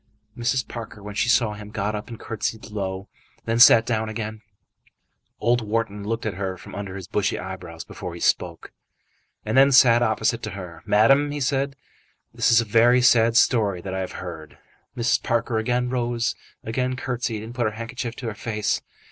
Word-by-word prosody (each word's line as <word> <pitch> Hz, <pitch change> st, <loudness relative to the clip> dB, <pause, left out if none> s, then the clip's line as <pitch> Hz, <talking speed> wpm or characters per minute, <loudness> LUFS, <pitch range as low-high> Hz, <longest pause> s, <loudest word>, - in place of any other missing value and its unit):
Mrs. 120 Hz, 0 st, -1 dB
Parker, 110 Hz, -3 st, -8 dB
when 105 Hz, 0 st, -7 dB
she 115 Hz, +3 st, 0 dB
saw 110 Hz, -2 st, +3 dB
him, 105 Hz, 0 st, -9 dB
got 105 Hz, 0 st, -2 dB
up, 105 Hz, 0 st, -5 dB
and 115 Hz, -2 st, -9 dB
curtsied 110 Hz, 0 st, -4 dB
low, 95 Hz, -2 st, -4 dB, 0.3 s
and -, -, -34 dB
then 115 Hz, 0 st, 0 dB
sat 115 Hz, -1 st, +8 dB
down 110 Hz, -2 st, -1 dB
again. 110 Hz, 0 st, -5 dB, 1.0 s
Old 120 Hz, +2 st, +2 dB
Wharton 105 Hz, -1 st, -2 dB
looked 115 Hz, +2 st, -3 dB
at 110 Hz, -, -1 dB
her 95 Hz, 0 st, -4 dB
from 90 Hz, -, -12 dB
under 100 Hz, -2 st, -6 dB
his 95 Hz, -2 st, -7 dB
bushy 100 Hz, -2 st, 0 dB
eyebrows 90 Hz, -3 st, -7 dB
before 90 Hz, -3 st, -8 dB
he -, -, -8 dB
spoke, -, -, -1 dB, 0.7 s
and 110 Hz, -, -1 dB
then 135 Hz, +1 st, +6 dB
sat 120 Hz, -3 st, +6 dB
opposite 110 Hz, 0 st, +1 dB
to 110 Hz, -, -4 dB
her. 85 Hz, -4 st, -9 dB
"Madam," 135 Hz, +8 st, +4 dB
he 145 Hz, 0 st, -4 dB
said, 135 Hz, +1 st, 0 dB, 0.6 s
"this -, -, +2 dB
is 115 Hz, -, +7 dB
a 115 Hz, -, 0 dB
very 120 Hz, +3 st, +4 dB
sad 115 Hz, -1 st, +5 dB
story 105 Hz, -8 st, +3 dB
that 95 Hz, +1 st, -6 dB
I 95 Hz, -, -2 dB
have 95 Hz, -, -4 dB
heard." 80 Hz, -4 st, -8 dB, 0.4 s
Mrs. 120 Hz, 0 st, +2 dB
Parker 115 Hz, 0 st, 0 dB
again 125 Hz, +2 st, 0 dB
rose, 120 Hz, -2 st, 0 dB, 0.3 s
again 125 Hz, +3 st, -1 dB
curtsied, 120 Hz, -4 st, -3 dB
and 115 Hz, +2 st, -8 dB
put 125 Hz, -1 st, -1 dB
her 110 Hz, -, +1 dB
handkerchief 120 Hz, 0 st, -5 dB
to 125 Hz, -, -8 dB
her 110 Hz, -, -3 dB
face. 105 Hz, -1 st, -2 dB
110 Hz, 190 wpm, -24 LUFS, 105-120 Hz, 1.0 s, sat